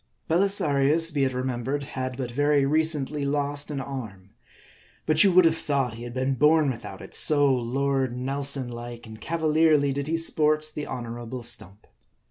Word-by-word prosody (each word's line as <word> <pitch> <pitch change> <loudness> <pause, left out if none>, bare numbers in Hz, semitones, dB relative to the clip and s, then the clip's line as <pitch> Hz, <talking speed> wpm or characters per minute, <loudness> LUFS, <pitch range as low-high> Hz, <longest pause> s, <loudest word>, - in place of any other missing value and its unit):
Belisarius, 165 -4 +2
be 140 -2 +1
it 130 - -2
remembered, 130 +2 -3
had 130 -2 -5
but 125 -3 -4
very 145 +2 +2
recently 150 -1 0
lost 145 +1 -2
an 145 -2 -4
arm. 115 -8 -8 0.7
But 155 0 +5
you 195 - +4
would 180 0 +6
have 165 0 +3
thought 140 -6 -1
he 115 +1 -8
had 120 - -8
been 130 +1 0
bom 150 +2 +3
without 120 - -9
it; - - -13
so 145 -3 +4
Lord 130 +1 -1
Nelson 135 0 -2
like 120 0 -8
and 110 0 -12
cavalierly 155 -2 +2
did 140 +1 -4
he 165 +1 0
sport 155 -1 +1
the 150 - -5
honorable 120 0 -6
stump. 110 -4 -6
140 Hz, 165 wpm, -25 LUFS, 125-150 Hz, 0.7 s, would